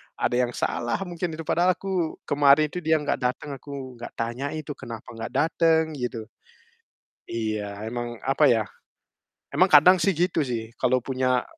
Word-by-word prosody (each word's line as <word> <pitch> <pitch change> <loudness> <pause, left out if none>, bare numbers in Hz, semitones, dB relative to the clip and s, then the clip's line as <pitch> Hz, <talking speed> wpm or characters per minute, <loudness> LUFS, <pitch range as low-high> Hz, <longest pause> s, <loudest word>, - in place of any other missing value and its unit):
ada - - 0
yang 120 -1 0
salah 120 0 -1
mungkin 175 -2 -4
itu 165 - -6
padahal 175 +3 +2
aku 185 -4 -2
kemarin 145 +1 +4
itu 180 - -4
dia 160 -2 +2
nggak 145 -2 -1
datang 125 +3 -2
aku 130 -4 -8
nggak - - -8
tanya 120 +4 -3
itu 155 -1 -5
kenapa 115 -5 -8
nggak 115 -1 -6
dateng, 160 +1 +3 0.2
gitu. 120 -2 -3 1.0
Iya, 105 -2 -3
emang, 120 -1 -5
apa 135 +3 +2
ya, 115 -4 +4 0.9
emang - - +4
kadang 165 +6 +7
sih 195 0 +2
gitu 175 +1 +1
sih, 115 -2 -4
kalau 125 -1 +2
punya 130 -1 +1
135 Hz, 160 wpm, -25 LUFS, 120-160 Hz, 1.0 s, kadang